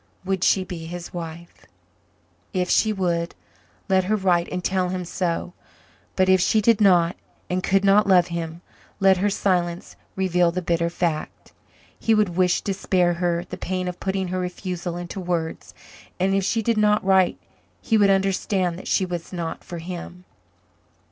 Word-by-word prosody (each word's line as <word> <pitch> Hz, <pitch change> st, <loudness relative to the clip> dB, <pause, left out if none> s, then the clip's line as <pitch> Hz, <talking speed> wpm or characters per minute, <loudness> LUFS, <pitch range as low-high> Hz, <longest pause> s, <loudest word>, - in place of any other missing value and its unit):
Would 190 Hz, -1 st, -1 dB
she 190 Hz, -, +3 dB
be 170 Hz, -3 st, -7 dB
his 175 Hz, 0 st, -7 dB
wife? 170 Hz, 0 st, -8 dB, 0.9 s
If 180 Hz, -2 st, 0 dB
she 220 Hz, -, +3 dB
would, 175 Hz, -4 st, -1 dB, 0.5 s
let 190 Hz, -2 st, +2 dB
her 215 Hz, +3 st, +1 dB
write 180 Hz, -4 st, +1 dB
and 180 Hz, 0 st, -3 dB
tell 185 Hz, -1 st, 0 dB
him 180 Hz, -1 st, -3 dB
so. 175 Hz, 0 st, -2 dB, 0.6 s
But 185 Hz, -1 st, +3 dB
if 190 Hz, -1 st, +5 dB
she 215 Hz, -, +3 dB
did 220 Hz, 0 st, +3 dB
not 175 Hz, -4 st, +4 dB, 0.4 s
and 185 Hz, 0 st, 0 dB
could 195 Hz, +1 st, +2 dB
not 200 Hz, +1 st, +5 dB
love 180 Hz, -2 st, +5 dB
him, 170 Hz, 0 st, -5 dB, 0.4 s
let 195 Hz, -1 st, +5 dB
her 205 Hz, +3 st, +1 dB
silence 180 Hz, -3 st, -1 dB, 0.2 s
reveal 180 Hz, -2 st, +2 dB
the 180 Hz, -, -2 dB
bitter 170 Hz, 0 st, 0 dB
fact; 170 Hz, -3 st, -3 dB, 0.5 s
he 225 Hz, -, +2 dB
would 210 Hz, -3 st, +3 dB
wish 180 Hz, 0 st, +1 dB
to 200 Hz, -, -1 dB
spare 180 Hz, -2 st, +1 dB
her 175 Hz, 0 st, -1 dB
the -, -, -7 dB
pain 185 Hz, 0 st, -3 dB
of 180 Hz, 0 st, -5 dB
putting 190 Hz, -1 st, -2 dB
her 185 Hz, +1 st, -2 dB
refusal 180 Hz, -1 st, -4 dB
into 175 Hz, +2 st, -6 dB
words, 175 Hz, -3 st, -3 dB, 0.4 s
and 190 Hz, +1 st, +2 dB
if 195 Hz, 0 st, +1 dB
she 225 Hz, +3 st, 0 dB
did 230 Hz, 0 st, +1 dB
not 210 Hz, -1 st, +3 dB
write 190 Hz, -1 st, +3 dB, 0.4 s
he 225 Hz, -, 0 dB
would 205 Hz, -2 st, +5 dB
understand 190 Hz, -2 st, +1 dB
that -, -, -10 dB
she 190 Hz, -, +2 dB
was 175 Hz, -2 st, -6 dB
not 170 Hz, -3 st, -5 dB
for 175 Hz, -, -7 dB
him. 180 Hz, +1 st, -8 dB
180 Hz, 175 wpm, -23 LUFS, 175-195 Hz, 0.9 s, if